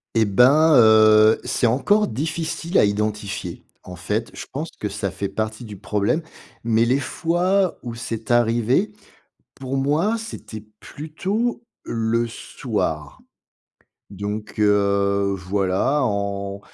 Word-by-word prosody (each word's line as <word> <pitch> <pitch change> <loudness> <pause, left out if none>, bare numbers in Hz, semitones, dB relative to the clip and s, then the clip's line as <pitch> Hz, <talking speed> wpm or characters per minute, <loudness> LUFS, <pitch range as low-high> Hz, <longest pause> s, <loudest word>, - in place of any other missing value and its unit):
Eh 110 - +4
ben, 140 +10 +5
heu, 110 -2 +6
c'est 120 - 0
encore 205 - +2
difficile 160 - -3
à - - +5
identifier. 105 -1 -3 0.2
En 90 - -9
fait, - - -3
je - - -8
pense - - -5
que - - -3
ça - - -3
fait 100 - -4
partie 110 +2 -4
du 105 -3 -9
problème, 105 - -1 0.4
mais 115 0 +2
les 130 +4 +2
fois 180 +6 0
où 120 -1 -5
c'est 115 -1 -5
arrivé, 120 - +2 0.6
pour 135 0 -4
moi, 160 +12 +1
c'était 115 - -8 0.2
plutôt 200 +11 -3 0.2
le 115 +1 -1
soir - - -4 0.9
donc 105 +2 -6
heu, 100 -1 +2
voilà, 95 +9 0
en 100 -2 -2
115 Hz, 120 wpm, -22 LUFS, 105-150 Hz, 0.9 s, heu